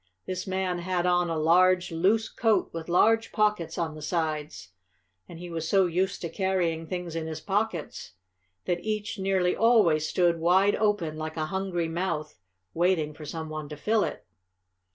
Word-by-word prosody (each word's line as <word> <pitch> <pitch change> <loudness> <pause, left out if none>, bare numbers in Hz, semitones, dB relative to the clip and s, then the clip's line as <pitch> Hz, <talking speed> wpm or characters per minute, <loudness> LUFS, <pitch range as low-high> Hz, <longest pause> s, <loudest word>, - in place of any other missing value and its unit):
This 185 +1 -4
man 185 -1 -1
had 180 0 -1
on 175 -1 +2
a 165 - -1
large, 180 +3 +3
loose 195 +7 +2
coat 220 -5 +1
with 165 0 -6
large 225 +6 +3
pockets 210 -5 0
on 165 -2 -2
the 155 - -10
sides, 155 - -3 0.6
and 170 - -9
he 175 +1 -8
was 165 -1 -3
so 195 -2 +4
used 185 +3 -1
to 170 - -2
carrying 170 -3 -1
things 175 -1 -5
in 160 -1 -3
his 160 -1 -5
pockets 195 - -3 0.5
that 175 -1 -1
each 215 -1 -3
nearly 190 -2 +1
always 200 -10 +4
stood 170 -2 +2
wide 185 +4 +4
open, 205 -8 0
like 155 +1 -5
a 155 - 0
hungry 190 -3 -1
mouth, 165 - -3 0.3
waiting 170 -3 +1
for 155 0 -10
some 160 +1 -5
one 155 -1 -6
to 150 - -7
fill 215 +7 +1
it. - - -5
175 Hz, 175 wpm, -27 LUFS, 160-190 Hz, 0.6 s, so